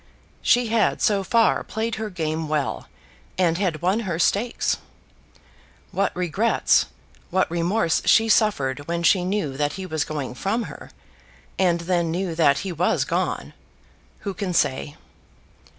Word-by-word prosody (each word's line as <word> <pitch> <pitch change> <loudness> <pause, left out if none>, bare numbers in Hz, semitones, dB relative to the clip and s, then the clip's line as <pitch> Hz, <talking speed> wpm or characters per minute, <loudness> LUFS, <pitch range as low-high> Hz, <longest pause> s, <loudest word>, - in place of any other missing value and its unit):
She 245 -1 +3
had 225 -1 +2
so 200 -2 +2
far 225 +4 +3
played 225 +1 -3
her 215 - -3
game 160 -3 -3
well, 150 -2 -2 0.5
and 175 -2 +2
had 175 -6 -1
won 190 +5 +2
her 185 -8 -3
stakes. 220 +7 +1 1.1
What 200 0 0
regrets, 180 +6 +2 0.4
what 185 -2 +1
remorse 170 +1 +1
she 225 - +5
suffered 145 - +1
when 170 0 -2
she 180 +2 +4
knew 185 -7 -1
that 145 0 0
he 190 - -6
was 155 -4 -1
going 145 -5 -4
from 200 - -1
her, - - -10 0.7
and 175 -3 +2
then 170 -1 0
knew 175 +1 -2
that 145 -4 +3
he 190 - -3
was 175 +2 +1
gone, - - -2 0.7
who 200 -2 -4
can 190 -3 -3
say? 145 0 0
180 Hz, 145 wpm, -23 LUFS, 160-205 Hz, 1.1 s, she